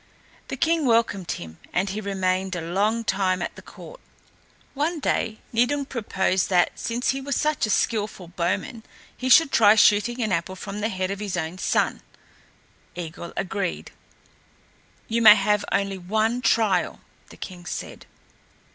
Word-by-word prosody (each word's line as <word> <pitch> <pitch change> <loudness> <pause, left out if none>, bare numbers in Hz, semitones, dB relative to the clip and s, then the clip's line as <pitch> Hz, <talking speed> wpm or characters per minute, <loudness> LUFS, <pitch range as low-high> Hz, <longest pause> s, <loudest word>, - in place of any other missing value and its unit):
The - - -5
king 325 -3 +1
welcomed 225 -6 +1
him, 80 -1 -9
and 190 +2 0
he 210 +2 -4
remained 190 -1 -1
a - - -2
long 205 +7 0
time 190 -3 0
at 175 - -4
the - - -11
court. - - -13 0.7
One 310 +4 -1
day 225 -5 -1 0.2
Nidung 265 +5 +1
proposed 195 -7 -1
that, 180 -2 +3
since 240 +2 -2
he 270 +1 0
was 280 0 -2
such 305 -6 0
a - - -6
skilful 210 -4 -1
bowman, 180 +6 -2 0.3
he 255 +1 -3
should 275 +3 +7
try 215 -1 +6
shooting 220 +3 +4
an 215 - -1
apple 180 +1 -1
from 200 +2 -6
the 220 - 0
head 185 -2 -2
of 200 - -4
his 200 -4 -3
own 170 +2 -4
son. - - 0 0.9
Eigil 170 0 -7
agreed. 190 -1 -3 1.2
"You 230 +1 0
may 215 -2 +10
have 210 0 +1
only 195 -1 0
one 220 +6 0
trial," 225 -4 +1 0.3
the - - -14
king 175 -2 -9
said. - - -7
205 Hz, 155 wpm, -24 LUFS, 185-230 Hz, 1.2 s, may